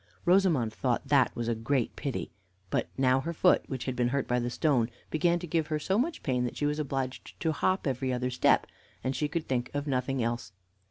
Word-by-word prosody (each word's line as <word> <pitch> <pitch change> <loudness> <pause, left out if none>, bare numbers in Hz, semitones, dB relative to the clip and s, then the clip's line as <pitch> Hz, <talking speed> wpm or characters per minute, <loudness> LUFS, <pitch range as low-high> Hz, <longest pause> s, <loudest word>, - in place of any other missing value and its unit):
Rosamond 175 - +3
thought 120 +1 -1
that 140 -3 +4
was 120 -1 -3
a 120 - +2
great 120 +2 -1
pity. 140 -4 -4 0.4
But - - +1
now 130 0 +4
her 165 +5 -3
foot, - - +4
which 130 -2 -4
had 130 - -2
been 120 0 +2
hurt 135 +2 -1
by 125 0 +1
the 120 0 -1
stone, 125 -4 +2 0.2
began 170 +2 +2
to 175 - -6
give 160 -2 0
her 155 - 0
so 190 +7 0
much 320 +7 -1
pain 125 -3 +1
that 120 - -4
she 145 - 0
was 150 +1 0
obliged 135 -3 -4
to 160 - +1
hop 185 +5 0
every 130 -1 -1
other 125 0 -1
step, 125 - +3 0.4
and 130 +1 -1
she 150 +3 0
could 165 +1 -3
think 125 -2 -1
of 145 0 -1
nothing 130 -2 0
else. 115 -5 -3
135 Hz, 225 wpm, -29 LUFS, 125-155 Hz, 0.4 s, that